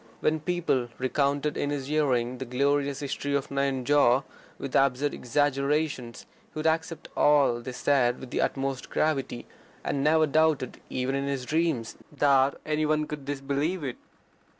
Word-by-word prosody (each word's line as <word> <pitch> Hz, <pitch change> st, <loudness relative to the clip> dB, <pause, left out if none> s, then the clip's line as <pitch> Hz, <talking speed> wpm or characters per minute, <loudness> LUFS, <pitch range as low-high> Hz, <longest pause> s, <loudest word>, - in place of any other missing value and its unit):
When 155 Hz, +1 st, +1 dB
people 155 Hz, -6 st, 0 dB
recounted 140 Hz, +3 st, 0 dB
in 145 Hz, -, -1 dB
his 145 Hz, -2 st, -3 dB
hearing 130 Hz, -5 st, 0 dB
the 130 Hz, -, -4 dB
glorious 140 Hz, +2 st, 0 dB
history 140 Hz, 0 st, -2 dB
of 140 Hz, -1 st, -2 dB
Nayanjore 140 Hz, -1 st, +3 dB, 0.3 s
with 135 Hz, -, -5 dB
absurd 140 Hz, +1 st, +2 dB
exaggerations 140 Hz, -1 st, -1 dB, 0.3 s
he -, -, -12 dB
would 155 Hz, -, -3 dB
accept 160 Hz, +1 st, 0 dB
all 140 Hz, -5 st, +4 dB
they 120 Hz, +2 st, -6 dB
said 125 Hz, -1 st, +2 dB
with 130 Hz, -, -10 dB
the -, -, 0 dB
utmost 135 Hz, -1 st, -2 dB
gravity, 135 Hz, -6 st, -1 dB, 0.4 s
and 140 Hz, -, -1 dB
never 155 Hz, +1 st, +4 dB
doubted, 155 Hz, -3 st, +1 dB
even 130 Hz, +1 st, -1 dB
in 140 Hz, 0 st, -1 dB
his 135 Hz, -2 st, -2 dB
dreams, 155 Hz, -6 st, -1 dB, 0.2 s
that 140 Hz, -1 st, +3 dB
any 155 Hz, 0 st, 0 dB
one 155 Hz, 0 st, +1 dB
could 150 Hz, -2 st, -7 dB
disbelieve 145 Hz, +5 st, -2 dB
it. 130 Hz, -3 st, -4 dB
140 Hz, 150 wpm, -27 LUFS, 130-150 Hz, 0.4 s, all